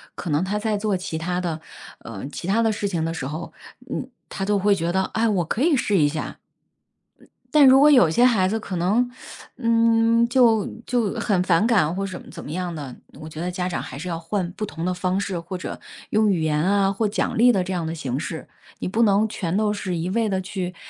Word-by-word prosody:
可 - - -6
能 150 +1 +1
她 195 +3 -1
在 210 0 -1
做 205 -1 0
其 180 -3 -4
他 175 +2 -2
的 165 -3 -3 0.5
呃， 110 -1 -7
其 170 - -6
他 210 +4 +2
的 225 -1 +2
事 205 -1 -2
情 170 -4 -2
的 165 +1 -2
时 140 -6 -4
候， 155 +4 -6 0.4
嗯， 260 - -4 0.2
她 195 - -4
都 205 +1 +2
会 200 +1 +3
觉 170 -3 -1
得， 190 0 +2
哎， 225 +1 +2
我 195 -5 +1
可 220 - -2
以 315 +1 +4
试 210 -6 +1
一 150 -4 +4
下。 155 +2 -5 1.1
但 300 -2 +7
如 265 0 +8
果 295 +1 +7
有 245 - +6
些 240 +10 +3
孩 210 -7 +4
子 220 +3 -1
可 200 -4 -6
能， 205 +9 +2 0.5
嗯， 230 -1 +3
就 235 -5 +4 0.2
就 235 -5 0
很 225 -5 0
反 180 +3 +3
感 195 -9 +2
或 195 +1 -2
什 185 -2 -6
么 - - -15
怎 - - -9
么 - - -8
样 175 +1 -3
的， 140 -5 -7 0.3
我 155 - -8
觉 155 0 -8
得 180 +2 -2
家 180 0 -2
长 175 - -3
还 130 - -8
是 180 +5 -6
要 165 -2 -3
换 175 +2 -2
不 215 - -5
同 165 -4 -6
的 180 - 0
方 180 +1 -1
式， 195 -3 -2
或 175 +3 -6
者 180 - -6 0.3
用 215 0 +3
语 180 -4 +1
言 150 -1 +1
啊 195 +1 +2
或 215 +3 0
奖 205 - -2
励 245 +2 +6
的 190 -5 +1
这 185 - -4
样 175 -3 -2
的 160 - -3
形 135 -5 -3
式， 160 +1 -5 0.3
你 - - -3
不 220 +5 +1
能 210 0 +3
全 180 -5 -3
都 210 0 +1
是 195 -3 -3
一 165 +2 -2
味 225 +2 +1
地 190 -2 0
去， 185 -1 -5
190 Hz, 260 characters per minute, -23 LUFS, 170-220 Hz, 1.1 s, 如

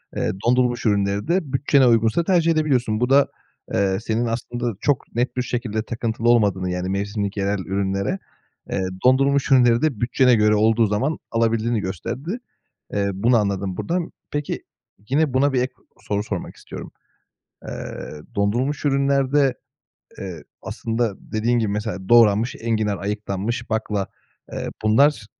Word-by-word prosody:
eee, - - 0 0.2
dondurulmuş 125 -1 +2
ürünleri 100 +1 +1
de 170 -5 0
bütçene 135 -1 +4
uygunsa 115 +7 +3
tercih 170 -2 +3
edebiliyorsun. 130 -9 +1
Bu 125 - +1
da, 140 +1 +5 0.5
eee, 95 -1 +2
senin 115 +2 -1
aslında 120 0 -3
çok 145 -6 -1
net 125 +2 -1
bir - - +2
şekilde 115 -3 -2
takıntılı 115 0 -1
olmadığını, 100 -6 +3
yani, 90 +1 -2
mevsimlik 100 +1 -2
yerel 100 0 0
ürünlere, 100 - -1 0.5
eee, - - 0 0.2
dondurulmuş 135 +2 +3
ürünleri 120 -2 +5
de 145 -9 0
bütçene 125 +1 +4
göre 105 0 +4
olduğu 110 +1 +3
zaman 130 +10 0
alabildiğini 115 0 +1
gösterdi. 120 - -4 0.5
Eee, 100 -1 0
bunu 115 +5 +3
anladım 100 -3 -1
buradan. 175 0 -2 0.2
Peki, 145 0 -3 0.5
yine, 145 -1 +2
buna 140 +2 +3
bir 125 - +2
ek 125 0 -2 0.3
soru 105 0 -2
sormak 95 -5 -5
istiyorum. - - -9 0.8
Eee, - - -6 0.2
dondurulmuş 120 +10 0
ürünlerde, 140 -1 +2 0.6
eee, 90 -5 -7 0.2
aslında 115 -2 -2 0.2
dediğin 120 +2 +1
gibi, 110 -2 0
mesela 105 -3 -4
doğranmış 115 0 +5
enginar 110 -4 0
ayıklanmış 105 +4 -3
bakla, 105 -3 -1 0.5
eee, - - -4 0.2
bunlar 110 +1 +4
115 Hz, 140 wpm, -22 LUFS, 100-130 Hz, 0.8 s, da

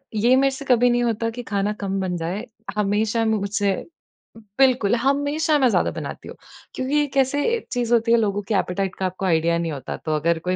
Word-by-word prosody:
ये 235 +4 +4
मेरे 270 +1 +3
से 280 - -8
कभी 245 -1 +4
नहीं 240 0 +2
होता 230 -1 0
कि 245 +2 -7
खाना 205 -1 -1
कम 195 0 -2
बन 180 -2 -2
जाए। 175 +7 -4 0.3
हमेशा 210 +2 +1
मुझसे 205 -2 0 0.9
बिल्कुल, 250 -5 +4
हमेशा 285 +5 +1
मैं 255 - +4
ज़्यादा - - +1
बनाती - - -7
हूँ। - - -9 0.4
क्योंकि 260 +3 -2
ये 295 - +3
कैसे 275 +2 +2
एक 455 - -7
चीज़ 240 -1 0
होती 230 0 +3
है 235 - +6
लोगों 205 -2 0
की - - +1
एपेटाइट 190 0 -1
का 190 - -3
आपको 185 +1 -3
आईडिया 170 -1 +2
नहीं 170 -1 -2
होता। 135 -3 -6
तो 155 -1 -2
अगर 165 +2 +1
कोई 180 +2 -2
220 Hz, 210 wpm, -22 LUFS, 190-250 Hz, 0.9 s, है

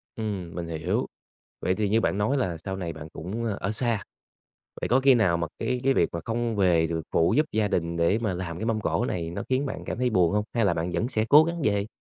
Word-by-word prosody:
Ừm, 100 -7 -4
mình 85 - -3
hiểu. 80 -1 -1 0.5
Vậy 90 - +1
thì 105 -1 0
như 110 +2 +3
bạn 100 - 0
nói 125 +8 +1
là 90 -10 -1
sau 95 +4 -5
này 85 -3 -4
bạn 80 0 -9
cũng, 100 +8 -5
ơ, 105 -3 -2
ở 100 - -1
xa, 115 -3 -1 0.8
vậy - - -2
có 125 +3 +4
khi 135 0 +6
nào 100 -8 +3
mà 85 -1 -1
cái 125 -1 -1
cái 135 0 +4
việc 85 - +3
mà 85 - -3
không 115 -1 -1
về 85 -4 +3
được 80 0 -3
phụ 85 +7 +3
giúp 155 +1 +3
gia 105 -1 +1
đình 85 -2 -1
để 85 +6 +2
mà 105 -6 -1
làm 85 -2 -5
cái - - -4
mâm 110 -2 0
cỗ - - 0
này 85 -2 -2
nó - - -4
khiến 130 +2 +1
bạn - - -5
cảm - - -4
thấy 125 -1 +1
buồn 90 -3 +3
hông? 105 0 +1
Hay 115 - +2
là 95 -4 +3
bạn 85 +2 -2
vẫn 115 - 0
sẽ 110 -3 0
cố 150 +2 +8
gắng 170 0 -3
về? 100 -2 +1
100 Hz, 270 wpm, -26 LUFS, 85-115 Hz, 0.8 s, cố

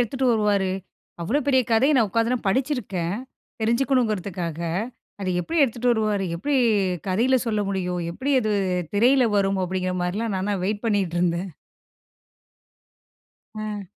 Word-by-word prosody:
எடுத்துட்டு 260 +3 0
வருவாரு? 205 -3 +2 0.5
அவ்ளோ 235 - +1
பெரிய 260 -2 +5
கதைய 265 +7 +4
நான் 225 -4 +3
உட்காந்து 230 +3 +1
நா - - -1
படிச்சிருக்கேன். 200 - -1 0.5
தெரிஞ்சுக்கணுங்கிறதுக்காக. 215 - 0 0.6
அத 190 - -2
எப்படி 330 - -2
எடுத்துட்டு 245 -1 0
வருவாரு? 215 -3 0
எப்படி 280 +11 0 0.5
கதையில 235 +8 +3
சொல்ல 215 -2 0
முடியும்? 180 -2 -2
எப்படி 275 +8 -2
அது 215 -2 0 0.4
திரையில 250 +4 +4
வரும்? 195 -1 +1
அப்படிங்கிற 185 0 -2
மாரிலாம் 205 +4 -2
நான்லாம் 200 +2 -1
வெயிட் 205 +3 -2
பண்ணிட்டிருந்தேன். 180 -3 0 2.0
அ. 215 -1 -5
210 Hz, 120 wpm, -24 LUFS, 185-245 Hz, 2.0 s, பெரிய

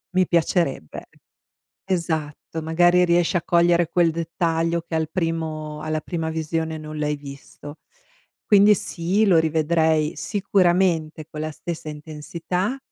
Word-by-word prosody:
mi 185 -1 +3
piacerebbe 165 - 0 0.8
esatto 160 -3 -3
magari 175 +3 +4
riesci 175 +1 +2
a 175 - 0
cogliere 170 0 +3
quel 170 -1 +3
dettaglio 165 0 -1
che 165 0 -8
al 160 -1 -1
primo 160 -3 -3
alla 155 0 -2
prima 160 0 -3
visione 160 0 -2
non 155 0 -7
l'hai 150 0 -1
visto, 145 +1 -11 0.7
quindi 205 0 +6
sì 185 +3 0
lo 185 -4 +5
rivedrei 160 -1 +1
sicuramente 175 -2 +1
con 150 - -8
la 155 0 -3
stessa 160 0 -6
intensità. 165 - -4
165 Hz, 125 wpm, -23 LUFS, 155-175 Hz, 0.8 s, quindi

